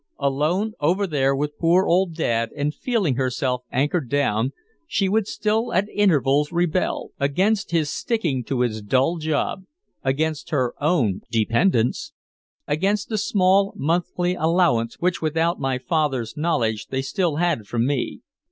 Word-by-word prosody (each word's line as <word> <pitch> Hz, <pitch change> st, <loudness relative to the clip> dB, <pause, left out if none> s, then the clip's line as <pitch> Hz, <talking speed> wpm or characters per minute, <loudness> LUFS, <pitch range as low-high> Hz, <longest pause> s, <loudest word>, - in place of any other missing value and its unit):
Alone 155 Hz, +10 st, 0 dB
over 180 Hz, +7 st, +1 dB
there 135 Hz, -5 st, +1 dB
with 150 Hz, +1 st, -3 dB
poor 175 Hz, +3 st, +4 dB
old 175 Hz, -1 st, +2 dB
Dad 115 Hz, -7 st, 0 dB
and 145 Hz, 0 st, -1 dB
feeling 200 Hz, -, 0 dB
herself 130 Hz, -1 st, -1 dB
anchored 140 Hz, +1 st, 0 dB
down, 135 Hz, -4 st, +1 dB, 0.4 s
she 195 Hz, -, +1 dB
would 210 Hz, +1 st, +1 dB
still 220 Hz, +3 st, -1 dB
at 190 Hz, +3 st, +2 dB
intervals 150 Hz, -8 st, +2 dB
rebel 175 Hz, +1 st, -1 dB
against 185 Hz, +9 st, +1 dB
his 160 Hz, -4 st, 0 dB
sticking 170 Hz, -, -1 dB
to 130 Hz, 0 st, -1 dB
his 110 Hz, -3 st, -1 dB
dull 130 Hz, +10 st, +1 dB
job, 155 Hz, +3 st, -1 dB, 0.4 s
against 150 Hz, +3 st, -1 dB
her 130 Hz, -5 st, 0 dB
own 135 Hz, -, +1 dB
dependence, 115 Hz, -, +1 dB, 0.5 s
against 195 Hz, +7 st, 0 dB
the 220 Hz, -, -1 dB
small 195 Hz, 0 st, +2 dB
monthly 175 Hz, +3 st, 0 dB
allowance 160 Hz, -9 st, +1 dB
which 180 Hz, 0 st, -1 dB
without 165 Hz, +2 st, 0 dB
my 135 Hz, -2 st, -1 dB
father's 135 Hz, -5 st, -1 dB
knowledge 135 Hz, -10 st, 0 dB
they 135 Hz, 0 st, -2 dB
still 170 Hz, +1 st, -1 dB
had 165 Hz, -10 st, 0 dB
from 120 Hz, +1 st, 0 dB
me. 140 Hz, -1 st, -2 dB
155 Hz, 145 wpm, -23 LUFS, 130-180 Hz, 0.5 s, poor